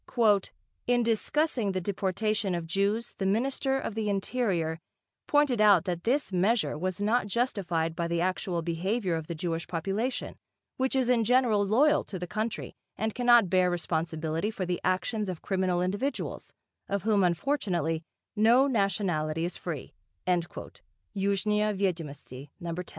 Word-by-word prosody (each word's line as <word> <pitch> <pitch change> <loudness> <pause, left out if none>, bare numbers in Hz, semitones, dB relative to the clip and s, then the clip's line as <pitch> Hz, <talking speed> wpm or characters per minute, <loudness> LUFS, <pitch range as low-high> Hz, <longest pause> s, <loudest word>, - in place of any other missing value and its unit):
"In 245 0 +3
discussing 235 -1 +1
the 185 - 0
deportation 200 +1 -1
of 170 -1 -3
Jews 200 +6 0
the 195 - -1
Minister 265 +5 0
of 225 - -4
the 215 -1 -2
Interior 195 -6 -1 0.5
pointed 290 -6 +3
out 200 -5 +6
that 175 -3 -3
this 270 0 +1
measure 185 -4 +2
was 185 +4 -3
not 215 +2 +1
justified 185 -8 -1
by 170 0 -1
the 170 0 -1
actual 180 -1 -1
behaviour 180 +4 -1
of 160 -1 -3
the 170 - -4
Jewish 165 0 -3
population, 195 +9 -2 0.4
which 260 +1 0
is 260 -2 +2
in 245 -2 +3
general 240 -3 +3
loyal 290 +9 +4
to 195 - -6
the 180 - -4
country 215 +5 -3 0.2
and 220 0 -1
cannot 240 -4 +5
bear 180 0 +3
responsibility 165 +1 -2
for 200 -4 -3
the 180 0 -2
actions 195 +3 0
of 180 -3 -6
criminal 185 -2 0
individuals, 205 +10 -3 0.4
of 200 -2 -1
whom 210 -2 +3
unfortunately 175 - 0 0.3
no 230 +5 +5
nationality 175 - 0
is 175 - -4
free" 160 -7 -6 0.3
(Yuzhnyia 200 +4 -2
Vyedomosti, 150 -7 -4
No 170 -2 -4
10). 180 +2 -4
195 Hz, 145 wpm, -28 LUFS, 175-225 Hz, 0.5 s, out